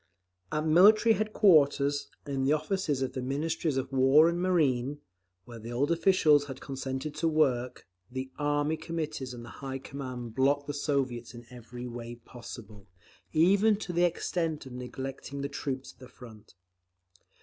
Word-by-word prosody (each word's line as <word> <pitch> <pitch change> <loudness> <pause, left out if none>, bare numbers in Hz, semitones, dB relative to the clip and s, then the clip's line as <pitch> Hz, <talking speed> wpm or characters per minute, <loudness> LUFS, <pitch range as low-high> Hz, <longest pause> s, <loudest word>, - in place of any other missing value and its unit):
At 155 +1 -1
Military 210 +8 +6
headquarters, 155 -9 +3 0.2
and 140 - -5
in 135 -1 -1
the 140 +3 +3
offices 155 -3 -1
of 130 - -3
the 130 - -3
Ministries 145 +2 -1
of 130 0 -3
War 135 +4 +5
and 170 +1 -2
Marine, 145 -7 +1 0.5
where 120 -1 -10
the 115 +2 -8
old 140 +6 0
officials 165 -4 +4
had 135 -2 -8
consented 135 +2 -5
to 165 - -1
work, 130 -6 0 0.2
the 130 +1 -5
Army 145 +1 0
Committees 155 -5 -4
and 120 -1 -9
the - - -10
high 135 -1 -4
command 130 -4 -7
blocked 140 +3 +2
the 145 - -4
Soviets 130 -5 -2
in 120 0 -11
every 125 0 -9
way 120 -1 -7
possible, 115 -3 -11 0.4
even 200 +7 +4
to 195 -3 -6
the 175 +1 +2
extent 165 -3 -1
of 130 - -10
neglecting 135 +2 -6
the 140 - -3
troops 135 -1 -5
at - - -33
the 130 -2 -12
front. 110 -6 -14
140 Hz, 160 wpm, -29 LUFS, 125-155 Hz, 0.5 s, Military